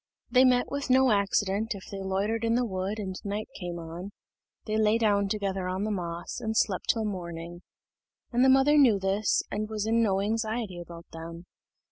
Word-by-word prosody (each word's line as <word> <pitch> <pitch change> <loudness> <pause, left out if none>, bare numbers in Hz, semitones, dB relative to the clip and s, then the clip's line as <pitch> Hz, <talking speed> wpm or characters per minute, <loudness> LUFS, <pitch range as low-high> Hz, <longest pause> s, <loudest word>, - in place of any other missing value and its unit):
They 255 +1 +6
met 250 -1 +4
with 280 -1 -3
no 260 0 +5
accident 205 +1 +1
if 190 - -10
they 195 -1 -5
loitered 200 +4 -1
in 230 0 +2
the 245 0 +2
wood 190 0 -3
and 190 -3 -4
right 205 +1 -3
came 175 -2 -5
on; 170 +3 -7 0.6
they 215 - -2
lay 215 0 +3
down 205 -3 +2
together 195 -3 -2
on 185 +2 -2
the 215 - -1
moss, 175 -3 -4
and 220 0 -2
slept 185 -4 0
till 225 -2 +2
morning; 175 -3 -6 0.7
and 245 +1 +3
the 265 - +6
mother 270 +3 +5
knew 240 -7 +6
this, 195 +2 +1
and 215 +1 -2
was 215 -1 -2
in 225 +1 +2
no 195 -4 +2
anxiety 220 -2 -2
about 170 -1 -10
them. 165 +1 -8
205 Hz, 190 wpm, -28 LUFS, 185-225 Hz, 0.7 s, They